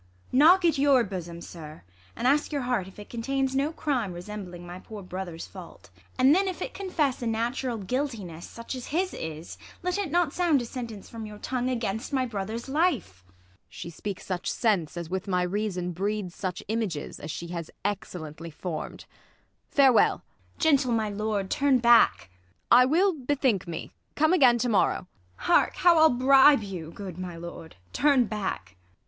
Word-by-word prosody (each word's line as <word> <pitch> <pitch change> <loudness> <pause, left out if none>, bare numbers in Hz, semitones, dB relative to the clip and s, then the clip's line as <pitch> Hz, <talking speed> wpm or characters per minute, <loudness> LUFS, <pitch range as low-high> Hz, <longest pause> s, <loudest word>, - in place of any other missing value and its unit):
Knock 340 +7 +6
at 320 -4 +3
your 275 -3 +5
bosom, 175 -4 -6
sir, 155 -3 -10 0.3
and - - -4
ask 290 +4 +2
your 285 -3 -1
heart 245 -7 -1
If 190 - -14
it 210 - -10
contains 265 +3 -2
no 280 +3 +1
crime 255 - -1
resembling 180 -1 -8
my 175 +1 -8
Poor 210 +1 -9
brother's 180 -2 -6
fa - - -11
\\t, - - -21 0.3
and 260 +2 +6
then, 385 +3 +3
if 375 - -3
it - - -5
confess 310 -10 -1
A 240 - -2
natural 235 +2 -1
guiltiness, 210 - -4
such 230 +2 -7
as 255 -2 -6
his 365 +5 -1
is, 160 +1 -7 0.2
Let 360 +2 -1
it 395 -5 -2
not 340 -1 +1
sound 340 -6 +3
a 240 - -4
sentence 230 -4 -7
from 225 -2 -7
your 210 0 -10
tongue 250 +3 -2
Against 230 +1 -3
my 260 -1 +2
brother's 220 +1 -4
life! 270 - 0
Ang. 95 - -28 0.4
She 170 - -8
speaks 195 +3 -6
such 185 -2 -3
sense 195 -9 0
As 170 -1 -4
with 190 +1 -3
my 180 -2 +1
reason 180 -1 -2
breeds 195 +1 -2
such 185 -1 -4
images, 210 -9 -3
As 150 - -7
she 170 +2 -5
has 170 -2 -5 0.2
excellently 170 -5 -4
form'd. 165 +1 -6 0.6
Farewell! 270 -4 +4 0.3
ISAB. - - -27
Gentle, 280 -6 +3
my 220 -2 0
lord, 205 -1 -2
turn 280 -2 +3
back! 225 - +4 0.4
Ang. 245 - +9
I 250 - +6
will 360 +8 +3
bethink 265 - 0
me; 165 -2 -6 0.2
come 315 +3 +3
again 255 -9 +6
to 245 - 0
morrow. 210 - +2
IsAB. 90 - -20
Hark, 345 - +3
how 345 -2 +5
I'll 315 0 +7
bribe 265 0 +6
you; 180 -5 -6
good, 185 0 -8
my 180 -2 -6
lord, 165 -1 -9 0.2
turn 280 -3 +4
back 205 - -4
220 Hz, 185 wpm, -27 LUFS, 180-270 Hz, 0.6 s, Ang